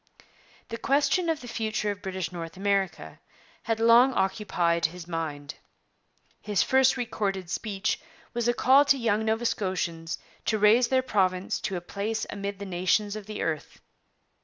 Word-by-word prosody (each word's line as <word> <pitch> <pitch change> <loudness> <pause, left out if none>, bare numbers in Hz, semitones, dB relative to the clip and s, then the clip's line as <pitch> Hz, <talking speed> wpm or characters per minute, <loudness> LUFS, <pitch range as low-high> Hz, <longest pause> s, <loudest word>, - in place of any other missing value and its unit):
' - - -29
The 230 0 -5
question 295 +5 +2
of 320 -2 -1
the 245 - -9
future 220 -2 -2
of 200 0 -8
British 185 -3 -4
North 170 0 -7
America 190 - -1 0.4
had 225 -1 -1
long 235 +3 +6
occupied 175 -4 +1
his 170 +1 -10
mind. 155 -4 -4 0.9
His 205 -3 +1
first 265 0 +3
recorded 195 -7 -3
speech 200 -2 -2 0.3
was 240 -1 -1
a 240 - +3
call 270 +4 +6
to 280 -1 +4
young 220 -3 +1
Nova 220 +2 0
Scotians 170 -6 -2 0.3
to 220 - +1
raise 215 +4 +5
their 260 -1 +2
province 190 -6 0
to 190 - -3
a 175 - -3
place 210 +5 -3
amid 200 0 -4
the 200 - -7
nations 190 +3 0
of 215 -2 -8
the 215 -1 -4
earth. 155 -2 -4
205 Hz, 160 wpm, -27 LUFS, 180-230 Hz, 0.9 s, long